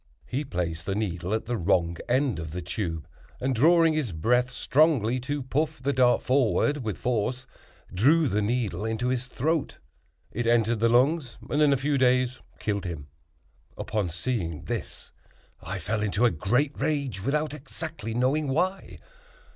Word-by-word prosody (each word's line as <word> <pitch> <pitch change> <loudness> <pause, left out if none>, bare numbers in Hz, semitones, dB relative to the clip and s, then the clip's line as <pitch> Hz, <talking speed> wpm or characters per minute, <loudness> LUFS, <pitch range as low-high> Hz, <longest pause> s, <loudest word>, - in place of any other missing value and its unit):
He 135 +4 -2
placed 85 - -4
the 95 - 0
needle 90 -4 -2
at 110 - -1
the 120 +1 -2
wrong 85 -2 +1
end 130 - +1
of 80 -1 -5
the 90 +4 -5
tube, 85 -4 -4 0.3
and 130 +1 0
drawing 165 +6 +5
his 150 -8 -1
breath 125 +10 +2
strongly 130 -2 +2
to 140 +2 -3
puff 150 +4 -1
the 140 +2 0
dart 125 -1 +3
forward 135 +3 +2
with 110 -8 -4
force, 125 +2 -1 0.5
drew 145 - +4
the 105 -3 0
needle 105 -4 -1
into 110 +3 -1
his 125 -1 -1
throat. 155 +4 -1 0.5
It 120 +1 -2
entered 115 -1 +3
the 115 +1 +3
lungs, 130 +2 +2
and 145 - 0
in 150 -2 +5
a 140 - +3
few 140 +1 0
days 125 0 +2 0.2
killed 100 -2 -2
him." 75 -5 -6 0.7
Upon 105 -5 -2
seeing 85 -2 -3
this - - -6 0.5
I 95 +3 -5
fell 105 +5 -2
into 105 +3 +1
a 120 - +4
great 120 - +1
rage, 140 -9 -1
without 150 +5 -1
exactly 150 -4 -7
knowing 135 +5 +1
why. 180 +8 -1
125 Hz, 165 wpm, -27 LUFS, 105-140 Hz, 0.7 s, drawing